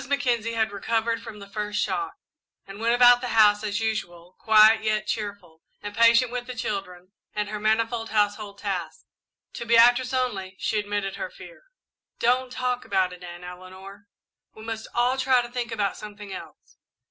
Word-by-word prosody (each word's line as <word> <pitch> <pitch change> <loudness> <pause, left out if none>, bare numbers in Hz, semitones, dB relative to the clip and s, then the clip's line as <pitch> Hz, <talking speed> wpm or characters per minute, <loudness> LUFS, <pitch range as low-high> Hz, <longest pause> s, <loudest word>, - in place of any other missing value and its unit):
Mackenzie 240 -5 0
had 220 -2 +1
recovered 225 +3 -1
from 215 - -9
the 200 -1 -11
first 210 +1 -3
shock 395 - -2 0.5
and 195 +1 -10
went 230 +1 +2
about 245 0 +7
the 250 - -3
house 210 -1 +5
as 210 0 -1
usual, 180 -6 -4
quiet 220 0 +6
yet 215 -1 0
cheerful, 200 -7 -5 0.2
and 205 0 -8
patient 230 +1 +5
with 245 0 -4
the 255 - -6
children 195 -5 -5 0.2
and 210 -1 -2
her 210 0 -4
manifold 225 +2 0
household 205 -1 0
tasks. 200 - -5 0.5
To - - -5
Beatrice 240 +2 +5
only 210 -8 -2
she 215 - -1
admitted 205 -1 -3
her - - -4
fear. - - -14 0.5
"Don't 250 +2 +1
talk 250 0 -2
about 190 -5 0
it, 180 0 -13
Aunt 175 0 -9
Eleanor 185 +3 -11 0.5
we 220 - -11
must 225 0 -5
all 250 +2 +2
try 260 -1 +4
to 240 - -8
think 240 -1 -4
about 205 -4 -1
something 205 -1 -9
else." - - -11
215 Hz, 170 wpm, -25 LUFS, 200-235 Hz, 0.5 s, about